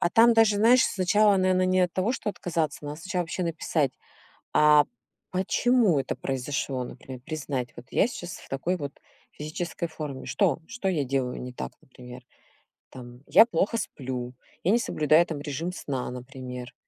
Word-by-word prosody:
А 175 - +3
там 235 +1 +6
даже, 225 -2 +5
знаешь, 235 +5 +6
сначала, 205 +2 +3
наверно, 185 0 +2
не 185 0 +3
от 180 -1 +2
того, 195 +6 0
что 210 - -2
отказаться, 160 -6 -3
надо 145 +2 -6
сначала 185 0 -2
вообще 175 +2 -4
написать, 155 -4 0 0.6
а 150 -1 +6 0.5
почему 195 - +2
это 130 - -3
произошло, 135 0 -2
например, 130 +1 -9
признать. 135 -3 -4
Вот 120 - -11
я - - +3
щас 175 -8 -7
в - - -15
такой 165 +7 -1
вот 145 -3 -5 0.4
физической 160 +3 -4
форме. 150 -4 -6
Что? 190 -5 +1
Что 230 -4 -3
я 155 -7 +1
делаю 130 -1 -2
не 125 0 -6
так, 65 - -6
например? 125 -1 -12 0.7
Там 120 -1 -11
я 225 - +8
плохо 230 +1 0
сплю. 125 - -5 0.3
Я 185 - +3
не 235 - +4
соблюдаю 155 -3 +3
там 155 -4 -5
режим 150 +4 -3
сна, 135 -7 -4
например. 125 -1 -8
155 Hz, 165 wpm, -27 LUFS, 130-185 Hz, 0.7 s, я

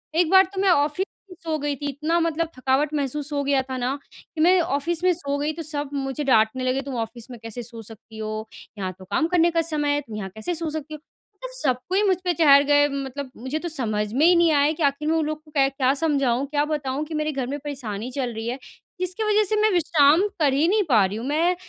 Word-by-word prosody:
एक 340 -1 +3
बार 380 0 +8
तो 380 - -2
मैं 395 - +3
ऑफ़िस 300 +3 +2 0.3
में - - -10
सो 320 -1 -1
गई 290 0 -2
थी 285 - -7
इतना 310 +5 0
मतलब 330 0 0
थकावट 270 +4 +1
महसूस 290 +1 -2
हो 285 -1 0
गया 275 -1 +2
था 260 0 -6
ना, 255 +3 -1 0.4
कि 310 - -1
मैं 360 +3 +5
ऑफ़िस 335 +2 -1
में 370 - +5
सो 285 -4 -3
गई 300 +2 -1
तो 330 - -7
सब 295 -2 -4
मुझे 270 +1 -3
डाँटने 255 -1 +2
लगे 255 +1 0
तुम 275 -1 -6
ऑफ़िस 230 +2 -6
में 240 - -9
कैसे 225 +2 -6
सो 230 0 -7
सकती 220 0 -13
हो, 215 0 -4 0.3
यहाँ 185 -2 -3
तो 185 - -11
काम 320 - 0
करने 345 -1 +3
का 330 0 +2
समय 300 -3 0
है 290 - -1
तुम 230 -6 -10
यहाँ 195 -2 -5
कैसे 220 +11 -3
सो 330 0 -3
सकती 310 0 -6
हो? 305 - -7 0.4
मतलब - - -8
सबको 375 - 0
मुझ 375 -2 +3
पे 355 - +2
चढ़ 285 -4 +6
गए 290 0 +4
मतलब 275 -1 -5
मुझे 260 +7 -4
तो 345 - -4
समझ 215 -8 -2
में 285 +6 +3
ही 355 +1 +6
नहीं 340 -1 +4
आया 290 +1 +3
कि 320 - -4
आख़िर 280 +2 0
मैं 325 - +2
उन 315 - 0
लोग 310 0 -4
को 305 - -18
क्या 270 -1 +2
समझाऊँ, 275 -4 +1
क्या 290 +1 0
बताऊँ 290 -2 -2
कि 320 - -8
मेरे 305 0 -1
घर 265 -3 -3
में 285 +3 -4
परेशानी 250 -6 -5
चल 250 -2 -3
रही 225 +1 -5
है, 250 +3 -3 0.4
जिसकी 365 +4 -2
वज़ह 425 0 +3
से 430 - +1
मैं 430 -1 +4
विश्राम 325 +2 +4
कर 290 -4 +3
ही 290 +4 +2
नहीं 415 +3 +3
पा 215 -6 +5
रही 200 +3 -3
हूँ, 235 +4 -5
मैं 335 +5 +2
290 Hz, 255 wpm, -23 LUFS, 260-325 Hz, 0.4 s, बार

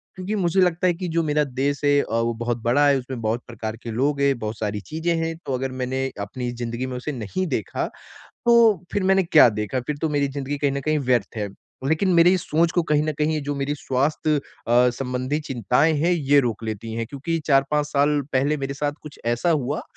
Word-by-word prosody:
क्योंकि 185 +3 -3
मुझे 185 -1 +2
लगता 180 0 +2
है 175 - +3
कि 180 +2 -5
जो 165 0 +1
मेरा 150 0 +2
देश 140 +1 -1
है 145 0 +4
अ, - - -5
वो 115 0 +1
बहुत 120 0 -1
बड़ा 130 +5 +3
है 140 - +4
उसमें 125 -2 -7
बहुत 110 +2 -1
प्रकार 115 -2 -5
के 115 - -5
लोग 140 +5 0
हैं, 140 -2 +3
बहुत 110 0 -4
सारी 105 -1 -2
चीजें 160 +2 -1
हैं। 165 0 -2
तो 135 - -2
अगर 130 +1 -2
मैंने 130 +1 -1
अपनी 120 +5 -4
जिंदगी 120 +2 -3
में 130 -1 -5
उसे 140 +4 -4
नहीं 130 - -3
देखा 120 - -2 0.6
तो 230 -6 +5
फिर 200 - 0
मैंने 190 0 +4
क्या 165 - +7
देखा 105 +5 -2
फिर 150 - -2
तो 160 - +2
मेरी 145 -2 +1
जिंदगी 140 +1 -4
कहीं 140 -1 +1
न 140 - -2
कहीं 155 +1 0
व्यर्थ 125 -5 0
है। 105 -1 -2 0.4
लेकिन 160 +5 +2
मेरी 170 +2 +6
इस 180 - -1
सोच 165 +2 +3
को 175 - +2
कहीं 150 0 +4
न 155 - -1
कहीं 155 0 +1
जो 145 +1 -3
मेरी 140 +1 -2
स्वास्थ्य 145 +4 0
अ, 125 -3 +1
संबंधी 130 +3 -2
चिंताएँ 135 +3 +1
हैं 170 +4 +2
ये 145 -4 +3
रोक 115 -3 -2
लेती 110 +1 -5
है 115 0 -2
क्योंकि 145 +6 -3
4-5 145 +1 +2
साल 145 0 +2
पहले 140 +4 +2
मेरे 140 0 -4
साथ 145 +1 -1
कुछ 150 - -11
ऐसा 120 +9 +1
हुआ 145 -2 0
140 Hz, 225 wpm, -23 LUFS, 125-155 Hz, 0.6 s, क्या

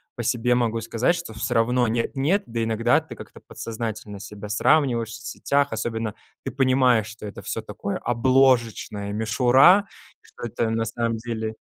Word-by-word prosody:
по 120 - -4
себе 120 +1 +1
могу 115 -2 0
сказать, 115 +9 +1
что 170 -8 -7
всё 110 - -3
равно 120 +2 +2
нет-нет, 140 - 0
да 115 -1 -3
иногда 115 0 +2
ты - - -11
как-то - - -12
подсознательно 110 -3 -6
себя 105 0 -9
сравниваешь 120 +1 +2
в - - -7
соцсетях, 140 +2 -1
особенно 110 -1 -3 0.3
ты - - -3
понимаешь, 130 -4 +3
что 110 0 -10
это 100 - -8
всё 115 - -4
такое 105 -2 -5
обложечная 120 -4 +1
мишура, 125 - +4 0.3
что - - -15
это 115 0 -2
на 115 0 -1
самом 115 0 -2
деле 110 -1 -4
115 Hz, 160 wpm, -24 LUFS, 110-125 Hz, 0.3 s, мишура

